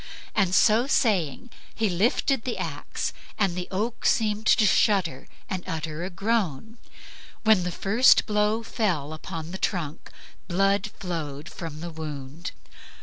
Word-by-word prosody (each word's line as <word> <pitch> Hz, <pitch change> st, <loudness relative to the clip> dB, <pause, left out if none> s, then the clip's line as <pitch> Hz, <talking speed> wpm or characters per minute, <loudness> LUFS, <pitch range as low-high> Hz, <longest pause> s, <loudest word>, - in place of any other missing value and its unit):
So 215 Hz, +6 st, +4 dB
saying, 210 Hz, -, +1 dB, 0.2 s
he 225 Hz, -, +1 dB
lifted 225 Hz, +7 st, +1 dB
the 250 Hz, -, -3 dB
axe -, -, -4 dB, 0.2 s
and 195 Hz, -4 st, +2 dB
the 180 Hz, 0 st, -4 dB
oak 220 Hz, +5 st, -2 dB
seemed 215 Hz, -1 st, +1 dB
to 215 Hz, -, +5 dB
shudder 190 Hz, -, +2 dB, 0.2 s
and 185 Hz, -1 st, -3 dB
utter 160 Hz, -1 st, -4 dB
a 180 Hz, -, -3 dB
groan. 215 Hz, -, -1 dB, 0.6 s
When 220 Hz, -4 st, +5 dB
the 180 Hz, -, -2 dB
first 220 Hz, +9 st, +4 dB
blow 210 Hz, +1 st, +1 dB
fell 170 Hz, -, -1 dB
upon 160 Hz, 0 st, -6 dB
the 190 Hz, -, -6 dB
trunk 165 Hz, -5 st, -2 dB, 0.4 s
blood 195 Hz, +3 st, +2 dB
flowed 155 Hz, -5 st, -4 dB
from 160 Hz, -3 st, -7 dB
the 170 Hz, 0 st, -5 dB
wound. 155 Hz, +1 st, -6 dB
185 Hz, 135 wpm, -26 LUFS, 165-215 Hz, 0.6 s, to